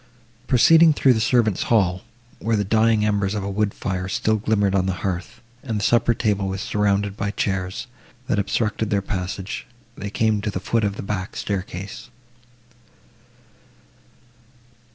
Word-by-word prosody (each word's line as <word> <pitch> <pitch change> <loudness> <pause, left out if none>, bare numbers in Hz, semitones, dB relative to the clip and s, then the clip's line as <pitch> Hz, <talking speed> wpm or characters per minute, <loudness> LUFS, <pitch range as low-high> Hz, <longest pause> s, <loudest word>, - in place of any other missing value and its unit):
Proceeding 160 +6 +6
through 135 -3 +4
the 110 - 0
servants 115 -4 +2
hall, 95 -5 +2 0.4
where 115 0 0
the 105 - +1
dying 110 +1 +3
embers 100 -1 0
of 105 - -2
a 100 - -3
wood 105 +1 0
fire 95 -2 -3
still 110 +2 +1
glimmered 105 -2 +1
on 95 -1 +1
the 95 - 0
hearth, 90 +5 -4 0.2
and 115 -5 -3
the - - -3
supper 120 +1 +3
table 105 -4 0
was 95 0 -3
surrounded 100 -1 0
by 100 -1 -2
chairs, 95 -2 -2 0.4
that 105 - 0
obstructed 105 +1 -1
their 100 -1 0
passage, 95 0 -4 0.3
they 100 - -5
came 110 0 +1
to 105 - -2
the 95 - -3
foot 115 +4 0
of 100 -1 0
the - - -6
back 95 -1 -4
staircase. 100 +3 -5
105 Hz, 155 wpm, -22 LUFS, 95-110 Hz, 0.4 s, Proceeding